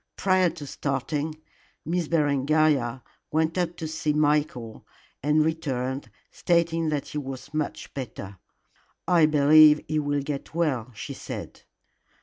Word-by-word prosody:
Prior 185 Hz, -2 st, +3 dB
to 160 Hz, -3 st, -9 dB
starting, 145 Hz, +3 st, -3 dB, 0.5 s
Miss 170 Hz, 0 st, -1 dB
Berengaria 145 Hz, -4 st, +2 dB, 0.3 s
went 160 Hz, +1 st, +1 dB
up 175 Hz, -2 st, -1 dB
to 160 Hz, -, -4 dB
see 155 Hz, -1 st, -1 dB
Michael, 150 Hz, -6 st, 0 dB, 0.4 s
and 150 Hz, +2 st, +3 dB
returned 135 Hz, -4 st, -2 dB, 0.2 s
stating 170 Hz, -2 st, +1 dB
that 150 Hz, -2 st, -2 dB
he 150 Hz, -, -3 dB
was 135 Hz, +1 st, -8 dB
much 155 Hz, -1 st, -4 dB
better. 105 Hz, -7 st, -7 dB, 0.7 s
"I 170 Hz, -4 st, +5 dB
believe 150 Hz, 0 st, +7 dB
he 155 Hz, -, 0 dB
will 145 Hz, -1 st, -1 dB
get 145 Hz, +2 st, -5 dB
well," 130 Hz, -8 st, 0 dB
she -, -, -6 dB
said. -, -, -8 dB
150 Hz, 130 wpm, -26 LUFS, 140-160 Hz, 0.7 s, believe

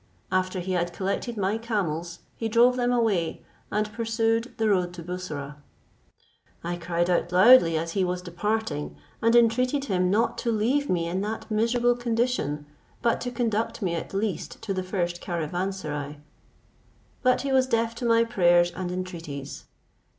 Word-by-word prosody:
After 185 Hz, 0 st, 0 dB
he 185 Hz, +2 st, -4 dB
had 175 Hz, -1 st, 0 dB
collected 200 Hz, +5 st, -3 dB
my 200 Hz, +2 st, 0 dB
camels, 175 Hz, -7 st, -3 dB
he 225 Hz, -, -3 dB
drove 240 Hz, +3 st, +5 dB
them 245 Hz, -1 st, +1 dB
away, 215 Hz, -9 st, 0 dB, 0.3 s
and 210 Hz, 0 st, -1 dB
pursued 225 Hz, +1 st, 0 dB
the 220 Hz, -, +1 dB
road 180 Hz, -4 st, +1 dB
to 170 Hz, -, -8 dB
Bussorah. 155 Hz, -5 st, -6 dB, 1.1 s
I 175 Hz, +1 st, -2 dB
cried 170 Hz, 0 st, -1 dB
out 175 Hz, -1 st, +1 dB
loudly 185 Hz, -3 st, +7 dB
as 165 Hz, +1 st, -2 dB
he 190 Hz, +2 st, +1 dB
was 180 Hz, 0 st, -2 dB
departing, 185 Hz, -2 st, -2 dB, 0.3 s
and 230 Hz, +1 st, +4 dB
entreated 250 Hz, +4 st, +3 dB
him 185 Hz, -6 st, +1 dB
not 225 Hz, +5 st, +1 dB
to 235 Hz, -, 0 dB
leave 250 Hz, +7 st, +1 dB
me 170 Hz, -2 st, +1 dB
in 180 Hz, +3 st, -2 dB
that 220 Hz, +2 st, -4 dB
miserable 240 Hz, +3 st, +2 dB
condition, 235 Hz, -, -1 dB, 0.4 s
but 235 Hz, -1 st, +2 dB
to 250 Hz, -, -2 dB
conduct 230 Hz, -2 st, -1 dB
me 175 Hz, -3 st, 0 dB
at 170 Hz, -, -4 dB
least 195 Hz, -4 st, -3 dB
to 195 Hz, -, -2 dB
the 185 Hz, -, -2 dB
first 175 Hz, -2 st, -2 dB
caravanserai; 165 Hz, -4 st, -3 dB, 1.0 s
but 255 Hz, -1 st, +3 dB
he 275 Hz, -, -1 dB
was 260 Hz, -1 st, +4 dB
deaf 230 Hz, -2 st, +1 dB
to 240 Hz, -, -5 dB
my 230 Hz, 0 st, +5 dB
prayers 175 Hz, -6 st, +3 dB
and 180 Hz, 0 st, -4 dB
entreaties. 165 Hz, -7 st, -6 dB
195 Hz, 160 wpm, -26 LUFS, 175-230 Hz, 1.1 s, loudly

